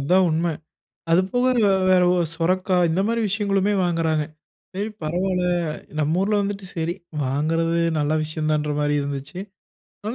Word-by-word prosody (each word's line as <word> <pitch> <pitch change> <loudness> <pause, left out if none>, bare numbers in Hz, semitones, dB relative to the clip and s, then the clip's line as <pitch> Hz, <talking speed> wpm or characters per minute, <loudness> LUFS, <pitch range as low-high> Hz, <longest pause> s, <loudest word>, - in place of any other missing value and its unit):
அதா 145 +7 +2
உண்ம. 160 +2 0 0.7
அது 170 +2 +5
போக 245 +1 +2 0.4
வேற 185 -1 +5 0.3
சொரக்காய் 180 +1 +1
இந்த 180 +4 +1
மாரி 230 0 0
விஷயங்களுமே 200 0 +1
வாங்குறாங்க. 165 -3 +1 0.5
சரி 205 +3 -2
பரவாயில்ல, 180 +3 0 0.5
நம்ம 155 +4 +1
ஊர்ல 205 +1 +2
வந்துட்டு 200 -1 -4
சரி 165 0 -1 0.3
வாங்குறது 165 +5 0 0.2
நல்ல 145 +1 +1
விஷயம்தான்ற 155 -1 -1
மாதிரி 145 0 +1
இருந்துச்சு. 140 +5 -5 0.7
ஆனா 220 +3 -3
170 Hz, 130 wpm, -23 LUFS, 155-190 Hz, 0.7 s, அது